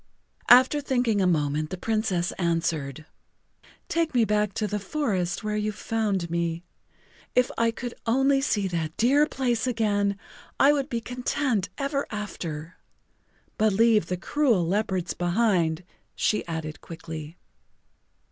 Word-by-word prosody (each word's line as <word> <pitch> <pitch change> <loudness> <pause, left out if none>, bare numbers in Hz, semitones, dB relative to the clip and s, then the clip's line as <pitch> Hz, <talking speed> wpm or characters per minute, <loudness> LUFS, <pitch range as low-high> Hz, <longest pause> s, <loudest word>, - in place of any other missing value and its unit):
[Pg 245 - +12
38]After 295 +1 -2
thinking 245 -6 +1
a 185 - +3
moment 155 -2 0
the 185 - -5
Princess 215 -4 0
answered: 165 -4 -1 0.8
"Take 330 -4 0
me 235 -2 +4
back 210 -1 +1
to 215 - -1
the 210 0 -2
forest 195 - -2
where 210 0 -2
you 210 0 -1
found 205 -4 -1
me. 170 0 -1 0.7
If 250 0 +3
I 230 0 +2
could 240 +1 -5
only 270 +3 +3
see 205 -8 0
that 160 -2 -3
dear 280 +6 +4
place 250 -4 -1
again 205 -4 +1 0.4
I 285 +2 +6
would 280 -1 -1
be 235 -2 -2
content 245 -3 -1
ever 275 0 -1
after. 170 -6 -6 0.8
But 215 -1 +3
leave 220 -3 +4
the 180 - -2
cruel 235 - +1
leopards 190 -2 -1
behind," 175 -3 +1 0.3
she 215 - +1
added 160 -2 -5
quickly. 160 -1 -8
210 Hz, 140 wpm, -26 LUFS, 170-240 Hz, 0.8 s, Pg